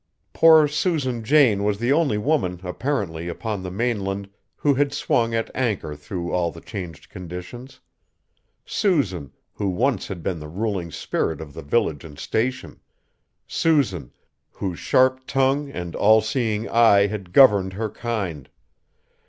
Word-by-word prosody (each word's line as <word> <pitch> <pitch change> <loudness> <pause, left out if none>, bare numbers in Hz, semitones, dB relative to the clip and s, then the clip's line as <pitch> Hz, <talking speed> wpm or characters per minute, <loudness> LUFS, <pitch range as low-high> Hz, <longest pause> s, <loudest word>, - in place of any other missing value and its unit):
Poor 160 -2 +7
Susan 145 -6 -1
Jane 115 -6 +4
was 105 -1 +1
the 120 +5 +1
only 145 -8 +2
woman, 105 - 0
apparently, 90 - -3
upon 100 +3 -4
the 90 - -5
mainland, 100 -2 -2 0.3
who 145 - +2
had 140 +1 +1
swung 115 -1 +1
at 115 - -2
anchor 105 -12 -1
through 85 +4 -5
all 90 -2 +1
the 85 - -11
changed 90 -5 -8
conditions. 90 +9 -9 0.9
Susan, 105 - 0 0.2
who 100 - -2
once 125 +9 0
had 90 -5 -7
been 90 -1 -2
the 75 - -8
ruling 95 0 -3
spirit 80 0 -2
of 75 -3 -9
the - - -8
village 75 -1 0
and 75 -3 -11
Station! 130 +4 -2 0.7
Susan, 115 - 0 0.4
whose 90 -4 -5
sharp 130 0 +2
tongue 135 +2 +1
and 90 -9 -6
all 110 +2 +5
seeing 110 0 -1
eye 110 -4 +5
had 100 -3 -5
governed 100 -6 +5
her 110 +3 -2
kind! 95 - -4
105 Hz, 145 wpm, -23 LUFS, 90-130 Hz, 0.9 s, Poor